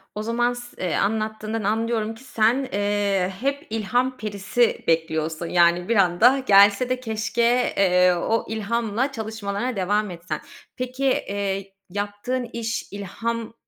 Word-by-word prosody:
O 210 Hz, -, -3 dB
zaman 240 Hz, +2 st, +1 dB
s 240 Hz, 0 st, -9 dB
eee, 180 Hz, -3 st, -1 dB
anlattığından 215 Hz, +1 st, -1 dB
anlıyorum 225 Hz, +1 st, 0 dB
ki 245 Hz, -, -15 dB
sen, 255 Hz, +2 st, +1 dB
eee, 200 Hz, -2 st, 0 dB
hep 280 Hz, +2 st, -2 dB
ilham 245 Hz, +4 st, 0 dB
perisi 215 Hz, +3 st, 0 dB
bekliyorsun. 160 Hz, 0 st, 0 dB
Yani, 175 Hz, +1 st, +3 dB
bir 235 Hz, -, +3 dB
anda 205 Hz, +7 st, +5 dB
gelse 200 Hz, +4 st, +6 dB
de 255 Hz, 0 st, 0 dB
keşke, 235 Hz, +1 st, +1 dB
eee, 180 Hz, -2 st, +4 dB
o 225 Hz, +6 st, 0 dB
ilhamla 225 Hz, +3 st, -1 dB
çalışmalarına 220 Hz, 0 st, -3 dB
devam 205 Hz, +1 st, 0 dB
etsen. 170 Hz, +1 st, -5 dB, 0.3 s
Peki, 255 Hz, +2 st, -3 dB
eee, 200 Hz, -6 st, -1 dB, 0.2 s
yaptığın 205 Hz, +6 st, -3 dB
iş 230 Hz, -1 st, -3 dB
ilhamla 225 Hz, +3 st, -4 dB
215 Hz, 130 wpm, -23 LUFS, 195-235 Hz, 0.3 s, gelse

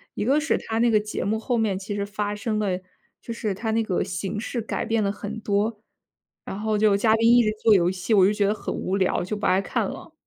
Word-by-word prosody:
一 -, -, -2 dB
个 275 Hz, +5 st, +3 dB
是 315 Hz, -, +1 dB
它 225 Hz, -, -4 dB
那 240 Hz, +1 st, +4 dB
个 215 Hz, -, +4 dB
节 210 Hz, 0 st, -4 dB
目 215 Hz, +3 st, 0 dB
后 245 Hz, +2 st, -1 dB
面 215 Hz, -4 st, 0 dB
其 200 Hz, +2 st, -5 dB
实 200 Hz, -, -1 dB
发 205 Hz, 0 st, -3 dB
生 215 Hz, +1 st, -2 dB
了 190 Hz, -4 st, -1 dB, 0.4 s
就 -, -, -7 dB
是 215 Hz, -3 st, -2 dB
它 220 Hz, +4 st, -4 dB
那 225 Hz, +1 st, +1 dB
个 190 Hz, -5 st, -1 dB
形 195 Hz, +3 st, -4 dB
式 235 Hz, +3 st, -4 dB
改 225 Hz, -, -3 dB
变 225 Hz, -1 st, +1 dB
了 200 Hz, -, +1 dB
很 210 Hz, +2 st, -6 dB
多， 210 Hz, +1 st, -1 dB, 0.7 s
然 195 Hz, -, -6 dB
后 215 Hz, 0 st, 0 dB
就 210 Hz, -1 st, +4 dB
嘉 220 Hz, +1 st, +3 dB
宾 225 Hz, 0 st, +2 dB
一 240 Hz, 0 st, +6 dB
直 215 Hz, -, +1 dB
做 225 Hz, -, +6 dB
游 175 Hz, -2 st, +3 dB
戏， 185 Hz, +3 st, -5 dB
我 190 Hz, -2 st, +6 dB
就 200 Hz, -, +3 dB
觉 205 Hz, -1 st, +1 dB
得 205 Hz, -, +2 dB
很 -, -, -5 dB
无 190 Hz, -, -2 dB
聊， 185 Hz, -2 st, +1 dB
就 185 Hz, +4 st, -3 dB
不 205 Hz, -, -4 dB
爱 185 Hz, +1 st, +3 dB
看 -, -, -1 dB
了。 315 Hz, -, -10 dB
210 Hz, 285 characters per minute, -24 LUFS, 200-225 Hz, 0.7 s, 一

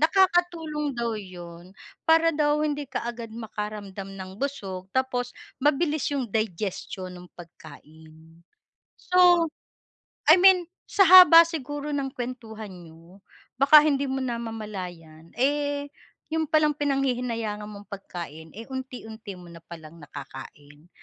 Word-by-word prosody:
nakakatulong 325 Hz, -5 st, +1 dB
daw 235 Hz, -1 st, -1 dB
'yun, 175 Hz, -1 st, -11 dB, 0.3 s
para 330 Hz, +1 st, +5 dB
daw 300 Hz, 0 st, +1 dB
hindi 295 Hz, -2 st, -3 dB
kaagad 235 Hz, -3 st, -5 dB
makaramdam 210 Hz, -3 st, -6 dB
ng 185 Hz, -1 st, -8 dB
busog 195 Hz, -10 st, -4 dB
tapos 250 Hz, -2 st, -1 dB, 0.3 s
mabilis 295 Hz, +1 st, +1 dB
'yung 270 Hz, -3 st, -1 dB
digestion 190 Hz, -3 st, -3 dB
nung 180 Hz, 0 st, -12 dB
pagkain. 160 Hz, 0 st, -15 dB, 0.6 s
So, 355 Hz, -2 st, +4 dB, 0.8 s
I -, -, +9 dB
mean 365 Hz, -2 st, +6 dB, 0.2 s
sa -, -, +1 dB
haba 355 Hz, -2 st, +10 dB
siguro 290 Hz, -2 st, -5 dB
ng 270 Hz, -2 st, -2 dB
kuwentuhan 230 Hz, -4 st, -7 dB
niyo 170 Hz, +1 st, -15 dB, 0.4 s
baka 295 Hz, +2 st, +8 dB
hindi 280 Hz, -2 st, +1 dB
mo 265 Hz, -, -2 dB
namamalayan, 195 Hz, -9 st, -6 dB
eh, 285 Hz, +2 st, 0 dB, 0.4 s
'yon 320 Hz, 0 st, 0 dB
palang 305 Hz, -1 st, +3 dB
pinanghihinayangan 245 Hz, -7 st, -2 dB
mong 205 Hz, -1 st, -11 dB
pagkain, 170 Hz, -5 st, -8 dB
eh, 225 Hz, +1 st, -9 dB
unti-unti 230 Hz, -5 st, -7 dB
mo 175 Hz, -, -13 dB
na 170 Hz, -1 st, -13 dB
palang 165 Hz, -2 st, -12 dB
nakakain. 145 Hz, +2 st, -11 dB
235 Hz, 115 wpm, -25 LUFS, 180-290 Hz, 0.8 s, haba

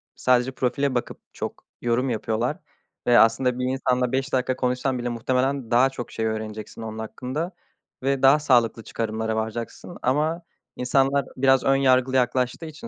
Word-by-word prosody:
sadece 125 Hz, 0 st, +2 dB
profile 135 Hz, +1 st, -1 dB
bakıp 120 Hz, -, -3 dB
çok -, -, -6 dB, 0.2 s
yorum 120 Hz, +2 st, +1 dB
yapıyorlar 115 Hz, +1 st, -1 dB, 0.5 s
ve 120 Hz, -1 st, +6 dB
aslında 125 Hz, +2 st, +3 dB
bir 125 Hz, -, 0 dB
insanla 125 Hz, -1 st, 0 dB
5 135 Hz, +2 st, -1 dB
dakika 130 Hz, 0 st, +1 dB
konuşsan 125 Hz, 0 st, -1 dB
bile 120 Hz, -, -2 dB
muhtemelen 125 Hz, +2 st, -1 dB
daha 125 Hz, +3 st, +5 dB
çok 125 Hz, -3 st, -7 dB
şey 110 Hz, -, -2 dB
öğreneceksin 110 Hz, 0 st, -5 dB
onun 110 Hz, 0 st, -6 dB
hakkında 130 Hz, -, -4 dB, 0.5 s
ve 135 Hz, -1 st, +1 dB
daha 135 Hz, +3 st, +7 dB
sağlıklı 120 Hz, -6 st, +2 dB
çıkarımlara 110 Hz, 0 st, -3 dB
varacaksın 110 Hz, +9 st, -5 dB
ama 155 Hz, +6 st, +1 dB, 0.3 s
insanlar 135 Hz, +2 st, +2 dB
biraz 135 Hz, 0 st, +4 dB
ön 135 Hz, -, +4 dB
yargılı 130 Hz, -1 st, +3 dB
yaklaştığı 125 Hz, +4 st, +1 dB
için 160 Hz, +9 st, -9 dB
125 Hz, 155 wpm, -24 LUFS, 120-135 Hz, 0.5 s, daha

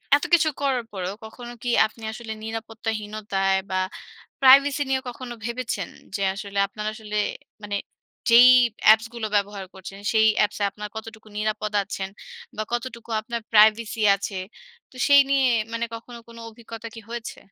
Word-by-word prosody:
এত 290 Hz, -, -1 dB
কিছু 320 Hz, -2 st, +6 dB
করার 265 Hz, -4 st, +1 dB
পরেও 185 Hz, -1 st, -3 dB
কখনো 240 Hz, +2 st, -9 dB
কি 245 Hz, -, -1 dB, 0.2 s
আপনি 220 Hz, +1 st, -9 dB
আসলে 220 Hz, 0 st, -6 dB
নিরাপত্তাহীনতায় 215 Hz, -3 st, -2 dB
বা 185 Hz, -, +1 dB, 0.6 s
প্রাইভেসি 275 Hz, +2 st, +7 dB
নিয়ে 265 Hz, 0 st, +1 dB
কখনো 245 Hz, 0 st, -7 dB
ভেবেছেন? 235 Hz, -5 st, -3 dB, 0.3 s
যে 200 Hz, -, -2 dB
আসলে 200 Hz, 0 st, -6 dB
আপনার 210 Hz, +2 st, -7 dB
আসলে 215 Hz, -1 st, -7 dB, 0.5 s
মানে 205 Hz, 0 st, -2 dB, 0.5 s
যেই 240 Hz, +2 st, +9 dB, 0.4 s
অ্যাপসগুলো 220 Hz, +1 st, +4 dB
ব্যবহার 200 Hz, -1 st, -1 dB
করছেন, 190 Hz, +1 st, -10 dB
সেই 220 Hz, -1 st, +5 dB
অ্যাপসে 210 Hz, 0 st, +1 dB
আপনার 210 Hz, +1 st, -7 dB
কতটুকু 220 Hz, 0 st, -9 dB
নিরাপদ 215 Hz, 0 st, -2 dB
আছেন? 190 Hz, -1 st, -5 dB, 0.5 s
বা 215 Hz, -, -1 dB
কতটুকু 235 Hz, -1 st, -4 dB
আপনার 235 Hz, +2 st, -5 dB
প্রাইভেসি 220 Hz, +1 st, +5 dB, 0.2 s
আছে? 200 Hz, 0 st, -5 dB, 0.5 s
তো -, -, -17 dB
সেই 285 Hz, 0 st, +8 dB
নিয়ে 275 Hz, -1 st, +4 dB, 0.3 s
মানে 230 Hz, 0 st, -1 dB
কখনো 235 Hz, +1 st, -9 dB
কোনো 230 Hz, 0 st, -12 dB
অভিজ্ঞতা 230 Hz, 0 st, -9 dB
কি 225 Hz, -, -8 dB
হয়েছে? 235 Hz, 0 st, -6 dB
220 Hz, 145 wpm, -24 LUFS, 210-240 Hz, 0.6 s, যেই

